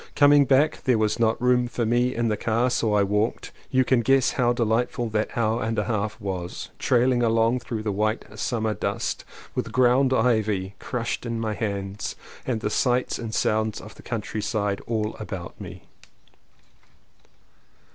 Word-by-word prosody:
Coming 145 -1 +6
back 140 +4 +3
there 125 -3 +3
was 110 +1 0
not 115 -1 +2
room 125 0 +3
for 120 -1 -2
me 120 +3 +1
in 115 0 0
the 110 - +1
car 120 +4 0
so 110 -3 +1
I 100 - +4
walked. 105 +3 -1 0.2
You 130 -1 +3
can 125 -1 +3
guess 135 +2 +3
how 120 -2 +2
delightful 120 0 0
that 110 +2 -2
hour 115 +1 +1
and 110 0 -2
a 105 - +2
half 105 0 -2
was; 95 -4 -5
trailing 125 0 +3
along 115 +1 +2
through 115 -3 -5
the 105 - -1
white 110 +3 -1
summer 110 -2 -1
dust, - - -3 0.3
with - - -3
ground 130 +1 +4
ivy 110 -6 +1
crushed 120 -2 -3
in 115 -1 -3
my 110 -1 -1
hands 100 -2 -4 0.3
and 120 -4 -1
the 105 - -1
sights 125 +1 +1
and 115 -2 -5
sounds 110 -1 0
of 105 0 -11
the - - -15
countryside 105 -2 -2
all 110 -2 -1
about 95 -5 -7
me. - - -9
115 Hz, 165 wpm, -25 LUFS, 105-125 Hz, 0.3 s, Coming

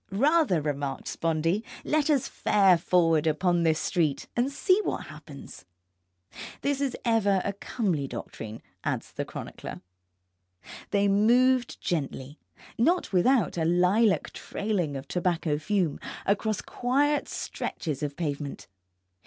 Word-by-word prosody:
Rather, 280 - +3
remarked 145 -2 -3
Spondee, 165 +5 0 0.2
let 305 0 +1
us 285 -4 +2
fare 195 -3 +4
forward 165 -2 +2
upon 175 +3 +2
this 160 -2 +3
street 160 -6 0
and 245 +3 +1
see 370 +7 +3
what - - -3
happens. 140 - -11 1.0
This 280 0 0
is 275 -3 -1
ever 210 -4 +3
a 200 - -1
comely 190 - -2
doctrine, 110 -3 -7 0.2
adds - - -3
the - - -4
chronicler. - - -8 1.1
They 200 0 +2
moved 240 +5 +3
gently, 145 -3 -3 0.4
not 335 - +2
without 190 0 +3
a - - +1
lilac 180 +6 +3
trailing 180 -9 -2
of 135 +1 -8
tobacco 170 -4 0
fume, 180 -2 0 0.3
across 210 +1 0
quiet 285 +4 0
stretches 150 -5 -4
of 145 -1 -3
pavement. 145 -4 -4
185 Hz, 120 wpm, -27 LUFS, 155-235 Hz, 1.1 s, fare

